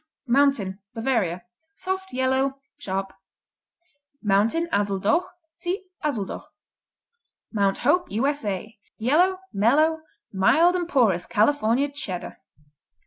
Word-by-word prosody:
Mountain 240 -7 +2 0.2
Bavaria 225 -7 0 0.3
Soft; 380 0 -4
yellow; 265 +1 0 0.2
sharp. 195 0 -3 1.1
Mountain, 215 +11 +2
Azuldoch 205 - +1 0.2
see 370 +4 -4 0.2
Azuldoch. 235 -10 -3 1.1
Mount 200 -2 +1
Hope 350 +5 +3
U.S.A. 220 -5 -2 0.2
Yellow; 350 +11 +2
mellow; 295 +11 +3 0.3
mild 275 - +4
and 350 -1 -2
porous 215 - +2
California 235 +3 +2
Cheddar. 205 -11 -6
250 Hz, 85 wpm, -24 LUFS, 200-300 Hz, 1.1 s, mild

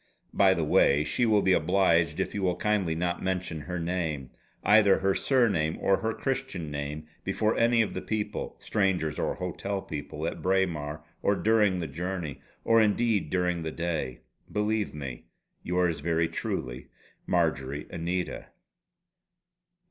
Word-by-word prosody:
By 95 -1 +5
the 85 - 0
way 75 -1 +4
she 120 +10 +1
will 105 -2 +4
be 95 - +4
obliged 85 -5 +2
if - - -1
you 105 - -2
will 90 -2 +1
kindly 100 -6 0
not 85 +1 -1
mention 90 -3 -2
her 90 +4 -5
name 85 -6 -2 0.3
either 105 -2 +6
her 95 0 +1
surname 100 - +2
or 95 0 +3
her 110 0 -1
Christian 135 - -3
name 75 +1 -4 0.2
before 105 +3 0
any 115 0 +4
of 110 - -4
the - - -4
people 110 -1 -3
strangers 95 -7 0
or - - -1
hotel 95 +2 -3
people, 75 -2 -6
at - - -4
Braemar 85 -6 0 0.2
or 100 - +2
during 105 -4 +2
the 80 - -3
journey 80 -2 -4 0.2
or 115 0 +5
indeed 105 -5 +2
during 90 -1 0
the 80 -1 -3
day. 80 -7 -3 0.3
Believe 105 -3 0
me, 65 -5 -6 0.4
Yours 90 -2 0
very 80 +2 +1
truly, 65 -6 -4 0.4
"MARJORY 70 +3 0
ANITA." 90 +2 -3
90 Hz, 150 wpm, -28 LUFS, 80-100 Hz, 0.4 s, either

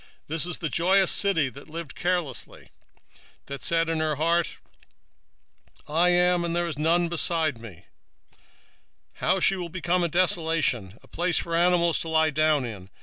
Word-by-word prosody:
2:15 - - -47
This 160 +1 +1
is 175 - -2
the 170 - -7
rejoicing 185 +6 +2
city 170 -7 +2
that 140 +2 -14
dwelt 165 -1 -8
carelessly, 175 -8 -4 0.7
that 140 0 -8
said 165 0 +1
in 165 -1 -1
her 155 -1 0
heart, 165 +3 0 1.3
I 165 +4 +2
am, 180 0 +3
and 170 0 -2
there 175 0 0
is 165 -3 -4
none 170 +3 +2
beside 165 -5 0
me: 100 -7 -12 1.3
how - - +1
is 190 - -3
she 185 -3 +1
become 180 +1 -1
a 170 - 0
desolation, 160 - 0
a - - -19
place 175 0 -1
for 170 - -3
beasts 170 0 +2
to 165 - -4
lie 160 0 +2
down 155 -2 +1
in! 100 -5 -9
165 Hz, 165 wpm, -25 LUFS, 155-175 Hz, 1.3 s, am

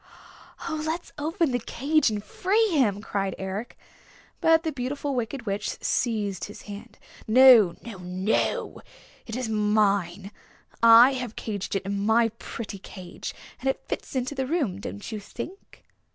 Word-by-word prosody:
"Oh, 310 -1 -2
let's 320 +2 -3
open 325 0 0
the 245 - 0
cage 280 +5 +1
and 210 -2 -3
free 420 - +1
him," 225 - +1
cried 195 -3 -2
Eric. 195 +4 -5 0.6
But 325 0 +4
the 320 - -1
Beautiful 280 +1 -3
Wicked 245 0 -3
Witch 205 0 -3
seized 210 -6 -1
his 210 - -11
hand. 210 +3 -10 0.3
"No, 230 -6 +7
no, 225 -5 -8
no! 185 +3 -1 0.5
It 225 - -5
is 250 -2 -2
mine. 205 -3 +1 0.5
I 230 +3 +8
have 250 -4 -4
caged 205 -3 -4
it 195 - -1
in 200 0 -2
my 225 +2 +4
pretty 210 -3 -7
cage. 185 -1 -8 0.2
And 265 - -1
it 265 - -3
fits - - -5
into 255 +2 -1
the 265 -2 -2
room, 270 - -1
don't 205 +3 -7
you 215 - -4
think?" 240 - -9
225 Hz, 150 wpm, -26 LUFS, 200-270 Hz, 0.6 s, I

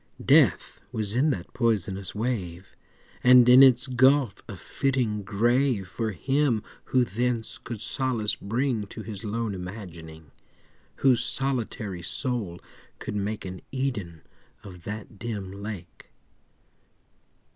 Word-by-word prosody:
Death - - +3
was 105 -2 -2
in 140 +5 +3
that 95 -9 -4
poisonous 100 -5 0
wave, 95 -6 -4 0.5
And 125 -1 +7
in 125 +2 +9
its 125 -2 +6
gulf 130 -1 +3
a - - -6
fitting 125 -6 -1
grave 115 +1 +1
For 110 +4 -3
him 135 +2 0 0.2
who 130 -1 +2
thence 115 +2 -2
could 115 -3 -7
solace 120 -6 0
bring 115 0 -2
To 110 - -8
his 105 -3 -8
lone 110 0 -2
imagining— 85 -5 -9 0.7
Whose 125 -3 +6
solitary 115 -8 -1
soul 105 - -3 0.4
could - - -6
make 105 +1 -3
An 95 0 -7
Eden 105 - -3 0.4
of 90 -5 -12
that 105 0 -7
dim 105 -5 -5
lake. 100 -3 -8
110 Hz, 120 wpm, -26 LUFS, 95-125 Hz, 0.7 s, in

